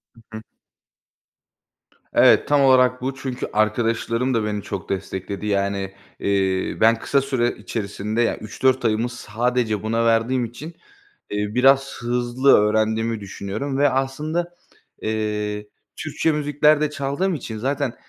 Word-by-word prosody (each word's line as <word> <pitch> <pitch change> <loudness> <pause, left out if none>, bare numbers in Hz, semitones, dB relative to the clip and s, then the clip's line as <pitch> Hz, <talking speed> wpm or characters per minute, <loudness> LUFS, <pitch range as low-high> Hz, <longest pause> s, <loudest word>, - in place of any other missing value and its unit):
Hı 115 - -18 0.2
hı. 110 - -10 1.7
Evet, - - +5
tam 145 -1 +3
olarak 130 -2 +4
bu 130 +1 -3
çünkü 130 -2 -4
arkadaşlarım 115 +3 0
da 115 -2 +1
beni 105 -1 -2
çok 95 -2 -6
destekledi. 95 +1 -4
Yani, 100 -1 -1 0.3
eee, 95 -2 0
ben 115 +1 +6
kısa 140 - +1
süre 130 -3 0
içerisinde, 105 +1 -3
yani, 115 - +1
3-4 130 +4 0
ayımı 115 +2 +1
sadece 120 -2 -1
buna 115 +1 0
verdiğim 115 +2 +2
için, 120 +7 -9 0.6
eee, 105 +1 -3
biraz 135 +2 +4
hızlı 120 +2 +2
öğrendiğimi 110 +1 +1
düşünüyorum 100 +7 -5
ve 145 +1 +4
aslında, 150 +6 -2 0.5
eee, 105 -1 -2 0.3
Türkçe 160 - -1
müzikler 150 0 +2
de 150 - +1
çaldığım 145 +6 -1
için 115 -6 -6
zaten 135 +1 -1
115 Hz, 130 wpm, -22 LUFS, 105-135 Hz, 1.7 s, ben